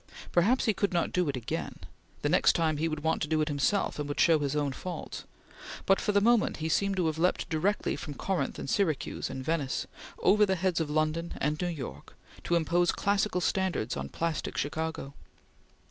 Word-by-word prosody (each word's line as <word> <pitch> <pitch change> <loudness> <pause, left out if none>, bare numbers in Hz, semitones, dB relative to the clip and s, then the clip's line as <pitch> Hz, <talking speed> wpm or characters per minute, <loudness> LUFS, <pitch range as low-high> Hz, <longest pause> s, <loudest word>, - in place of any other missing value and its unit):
Perhaps 215 +10 +3
he 220 - +3
could 200 0 -1
not 170 - +1
do 180 -4 +1
it 135 - -2
again; 120 - -4 0.5
the - - +2
next - - +5
time 160 -2 +1
he 160 +2 0
would 155 -1 -3
want 160 0 +1
to 155 - 0
do 155 0 +1
it 155 - +1
himself 145 +6 0
and 145 -1 -3
would 145 - -3
show 165 -2 +5
his 145 0 -1
own 145 -2 0
faults; 175 +7 -6 0.6
but 195 - +4
for - - +1
the 205 - +4
moment 230 +1 +3
he 160 0 -3
seemed 195 +4 +1
to 180 - +2
have 160 0 -1
leaped 180 +2 +1
directly 185 +6 0
from 145 -3 -7
Corinth 190 +4 -2
and - - -6
Syracuse 165 -9 0
and 130 -1 -6
Venice, 150 -4 -1 0.3
over 210 +1 +4
the 190 -2 +3
heads 185 -1 0
of 155 - -2
London 155 +2 0
and 150 +3 -1
New 180 - 0
York, 150 -8 -7 0.3
to 170 - +2
impose 170 +1 +2
classical 200 -2 0
standards 190 - 0
on 70 0 -4
plastic 165 - -3
Chicago. 155 -1 -3
165 Hz, 205 wpm, -29 LUFS, 150-190 Hz, 0.6 s, next